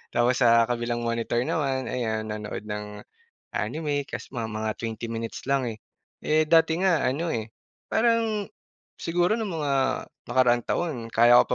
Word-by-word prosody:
Tapos 120 +2 +3
sa 115 -2 +6
kabilang 120 0 -1
monitor 115 +1 0
naman, 135 -3 0
ayan 110 -3 -1
nanood 105 0 -5
ng 105 -1 -6 0.5
anime 145 -3 -2
kasi - - -7
mga 115 -4 -3
mga 110 0 -1
20 115 0 -4
minutes 115 0 -5
lang, 135 -2 +1
eh. 110 -1 -5 0.5
Eh, 155 0 +2
dati 165 +1 +4
nga 185 -6 +3
ano, 155 +7 0
eh, 110 -6 -3 0.4
parang 225 -3 +2 0.5
siguro 175 +5 +1
nung 210 -6 -3
mga 145 -1 0 0.5
nakaraang 120 -2 +3
taon, 165 -5 -1 0.2
kaya 120 +1 +7
ko - - -17
125 Hz, 150 wpm, -26 LUFS, 115-160 Hz, 0.5 s, kaya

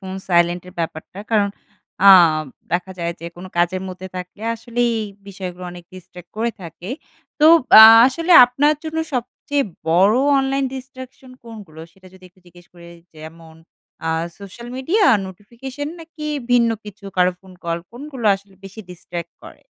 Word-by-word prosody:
Phone 190 -1 -7
silent 175 0 +2
এর - - -13
ব্যাপারটা। 165 +3 -6
কারণ 210 -3 +2 0.6
আম 165 -5 +6 0.3
দেখা 180 +2 -2
যায় 170 0 -2
যে 170 - -7
কোন 175 - -10
কাজের 175 +2 0
মধ্যে 185 0 -8
থাকলে 180 +4 -9
আসলে 235 +1 -6 0.2
এই 220 - -3 0.2
বিষয়গুলো 185 -2 -8
অনেক 175 -1 -12
distract 180 -1 -14
করে 230 +2 -1
থাকে। 170 +2 -10 0.5
তো 305 - +6 0.3
আ - - +12 0.2
আসলে 330 +6 0
আপনার 275 +5 +1
জন্য 320 0 -4 0.2
সবচেয়ে 275 +3 -2 0.2
বড় 185 +6 +4 0.2
অনলাইন 270 0 0
distraction 260 0 -11
কোনগুলো? 205 -9 -12
সেটা 190 -1 -20
যদি 185 0 -18
একটু 180 +1 -30
জিজ্ঞেস 175 0 -18
করি? 170 -1 -15 0.3
যেমন 160 +1 -13 0.5
আ - - 0 0.3
সোশ্যাল 205 +4 -11
মিডিয়া, 355 +11 +1 0.2
নোটিফিকেশন, 240 +9 -8
নাকি 320 -1 -11 0.3
ভিন্ন 235 -2 +3
কিছু, 210 0 -12
কারো 180 0 +3
ফোন 190 -1 -17
কল? 170 0 -2
কোনগুলা 260 -3 -4
আসলে 195 0 -21
বেশি 195 +3 -10
distract 170 -1 -8
করে? - - -14
195 Hz, 155 wpm, -19 LUFS, 175-245 Hz, 0.6 s, আ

